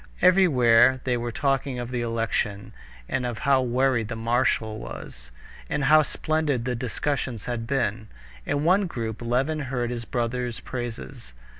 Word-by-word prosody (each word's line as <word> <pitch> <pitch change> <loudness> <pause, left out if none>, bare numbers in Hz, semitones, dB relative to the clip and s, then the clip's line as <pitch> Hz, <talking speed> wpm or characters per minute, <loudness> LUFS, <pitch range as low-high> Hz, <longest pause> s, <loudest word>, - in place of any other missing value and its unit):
Everywhere 130 -9 +5
they 125 -1 +1
were 120 0 -3
talking 135 0 0
of 120 0 -5
the 125 -1 -1
election, 115 -3 -2 0.3
and 130 - -1
of 120 -2 -3
how 135 +1 +3
worried 125 -2 +1
the 115 - -4
marshal 115 -1 0
was, - - -9 0.4
and 145 - -1
how 155 +3 +6
splendid 150 -4 -1
the 125 - -1
discussions 125 -1 -3
had 120 -2 -3
been. 115 -5 -1 0.4
In 145 - -1
one 185 +4 +3
group 115 -7 -5
Levin 130 +6 0
heard 125 -3 -2
his 120 -1 -4
brother's 120 +1 -2
praises. 110 - -7
125 Hz, 150 wpm, -25 LUFS, 115-135 Hz, 0.4 s, how